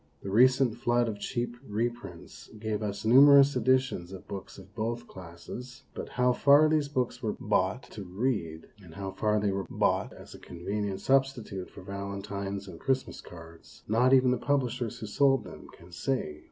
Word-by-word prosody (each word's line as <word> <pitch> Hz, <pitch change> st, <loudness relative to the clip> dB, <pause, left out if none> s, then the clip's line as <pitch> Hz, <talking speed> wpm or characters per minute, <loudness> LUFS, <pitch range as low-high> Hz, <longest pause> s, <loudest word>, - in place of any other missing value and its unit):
The 100 Hz, -, -5 dB
recent 130 Hz, +2 st, +4 dB
flood 120 Hz, 0 st, +1 dB
of 105 Hz, -2 st, -4 dB
cheap 120 Hz, +2 st, -3 dB
reprints 105 Hz, -6 st, -5 dB
gave 110 Hz, -1 st, -3 dB
us 100 Hz, 0 st, -4 dB
numerous 140 Hz, +3 st, +7 dB
editions 130 Hz, -7 st, +1 dB
of 95 Hz, -, -10 dB
books 95 Hz, -1 st, -8 dB
of 95 Hz, 0 st, -14 dB
both 120 Hz, +2 st, -3 dB
classes, 95 Hz, +9 st, -10 dB
but -, -, -6 dB
how 125 Hz, 0 st, +2 dB
far 145 Hz, +4 st, +5 dB
these 155 Hz, -2 st, +1 dB
books 125 Hz, -3 st, -2 dB
were 110 Hz, -, -2 dB
bought 105 Hz, +3 st, 0 dB
to 105 Hz, -, -7 dB
read, 95 Hz, -5 st, -2 dB, 0.2 s
and 85 Hz, -4 st, -14 dB
how 95 Hz, -1 st, -5 dB
far 105 Hz, +2 st, 0 dB
they 105 Hz, -1 st, 0 dB
were 95 Hz, 0 st, -3 dB
bought -, -, 0 dB
as -, -, -13 dB
a -, -, -12 dB
convenient 100 Hz, +3 st, -4 dB
substitute 130 Hz, -8 st, 0 dB
for -, -, -12 dB
valentines 100 Hz, 0 st, -5 dB
and 85 Hz, -3 st, -10 dB
Christmas 135 Hz, -1 st, -2 dB
cards, 85 Hz, -1 st, -14 dB
not 120 Hz, +4 st, +3 dB
even 130 Hz, -1 st, +5 dB
the 125 Hz, -, +1 dB
publishers 125 Hz, -4 st, -1 dB
who 110 Hz, -, -7 dB
sold 135 Hz, +3 st, +2 dB
them -, -, -11 dB
can 85 Hz, +1 st, -17 dB
say. 85 Hz, -, -3 dB
110 Hz, 175 wpm, -29 LUFS, 95-130 Hz, 0.2 s, numerous